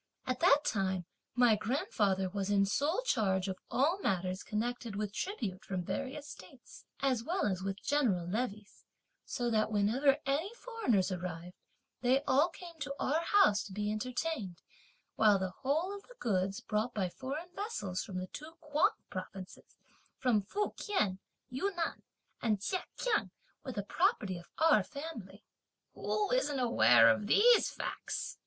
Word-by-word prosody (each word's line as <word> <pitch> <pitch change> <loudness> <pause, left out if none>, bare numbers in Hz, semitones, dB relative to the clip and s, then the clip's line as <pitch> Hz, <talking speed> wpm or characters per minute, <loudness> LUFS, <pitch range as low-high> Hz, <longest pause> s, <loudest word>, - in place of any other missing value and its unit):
At 255 0 -2
that 290 +3 +5
time 190 -3 0 0.3
my 245 -3 +5
grandfather 205 -4 0
was 195 +1 -3
in 200 -1 +4
sole 295 - 0
charge 195 - +1
of 190 -1 -4
all 315 +9 +2
matters 185 - -1
connected 230 0 -3
with 205 -1 -3
tribute 215 - -3
from 190 -4 -3
various 275 - -4
states, 210 +2 -13 0.2
as 260 -4 +1
well 360 +8 0
as 185 -3 0
with 195 +1 -4
general 235 -12 +2
levées, 210 +1 -4 0.4
so 240 -1 -2
that 215 -1 +2
whenever 240 +7 +3
any 285 +7 0
foreigners 250 - 0
arrived, 175 -1 -5 0.5
they 260 +3 +3
all 290 +5 +3
came 340 -1 -11
to 280 -1 -4
our 305 +5 +1
house 335 - +4
to 195 - -9
be 210 +1 -1
entertained, 225 - -3 0.5
while 210 -2 +6
the 190 -1 -2
whole 315 +8 0
of 400 - -9
the - - -15
goods, 195 -2 0
brought 215 +3 -1
by 195 -3 +1
foreign 285 - -6
vessels 210 - -3
from 185 - -6
the 185 - -2
two 305 - -9
Kuang 300 0 +2 0.2
provinces, 185 0 -8 0.4
from 235 -5 +2
Fukien, 375 - -1 0.3
Yunnan 345 +5 -2 0.4
and 215 -4 +1
Chekiang, 390 - -1 0.3
were 260 - -5
the 205 - -3
property 190 -2 +1
of 175 - -16
our 320 -1 +5
family." 235 - -8 0.5
"Who 420 +1 -1
isn't - - +1
aware 125 - +6
of 115 - +3
these 470 - +6
facts?" - - -4
230 Hz, 150 wpm, -33 LUFS, 195-295 Hz, 0.5 s, while